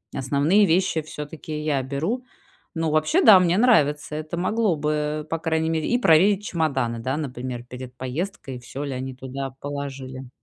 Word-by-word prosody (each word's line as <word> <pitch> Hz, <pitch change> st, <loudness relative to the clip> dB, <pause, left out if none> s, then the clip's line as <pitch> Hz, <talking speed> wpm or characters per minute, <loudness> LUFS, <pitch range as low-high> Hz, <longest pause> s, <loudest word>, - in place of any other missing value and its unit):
основные 145 Hz, +10 st, +3 dB
вещи 175 Hz, -2 st, +2 dB
всё-таки 150 Hz, 0 st, -7 dB
я 145 Hz, -3 st, +1 dB
беру. 155 Hz, -, -2 dB, 0.5 s
Ну, 160 Hz, -1 st, 0 dB
вообще, 155 Hz, -, +2 dB
да, 210 Hz, -, +9 dB
мне 180 Hz, 0 st, +2 dB
нравится. 150 Hz, -, +3 dB
Это 155 Hz, +2 st, -5 dB
могло 205 Hz, +1 st, +1 dB
бы, 150 Hz, 0 st, -1 dB
по 165 Hz, -, -2 dB
крайней 160 Hz, 0 st, 0 dB
мере 160 Hz, -1 st, -1 dB
и 240 Hz, -, +3 dB
проверить 195 Hz, +1 st, +4 dB
чемоданы, 140 Hz, -, -1 dB
да, 130 Hz, +5 st, -2 dB
например, 125 Hz, -4 st, -5 dB
перед 125 Hz, 0 st, -9 dB
поездкой, 135 Hz, +1 st, -5 dB
всё 130 Hz, +3 st, -7 dB
ли 140 Hz, -, -4 dB
они 130 Hz, 0 st, -5 dB
туда 135 Hz, +1 st, -5 dB
положили. 135 Hz, -2 st, -6 dB
150 Hz, 160 wpm, -24 LUFS, 135-170 Hz, 0.5 s, да